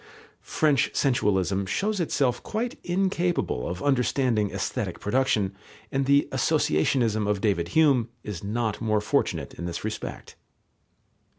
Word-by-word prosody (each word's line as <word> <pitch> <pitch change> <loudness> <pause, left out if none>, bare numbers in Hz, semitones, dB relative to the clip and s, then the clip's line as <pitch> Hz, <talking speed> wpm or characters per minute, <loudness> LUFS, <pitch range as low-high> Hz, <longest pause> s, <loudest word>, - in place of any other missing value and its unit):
French 150 -5 +2
sensualism 100 - +1
shows 205 - -1
itself 135 -7 0
quite 235 +3 -3
incapable 180 - 0
of 90 +1 -5
understanding 125 -5 +1
aesthetic - - -3
production, 105 -4 +1 0.4
and 135 0 0
the 140 0 +4
associationism 110 - +1
of 105 -1 +1
David 95 -5 0
Hume 135 -7 +4
is 100 -4 -6
not 110 +1 -2
more 110 -2 +2
fortunate 105 - -1
in 85 - -7
this 85 - -5
respect. - - -6
120 Hz, 120 wpm, -26 LUFS, 100-140 Hz, 0.4 s, the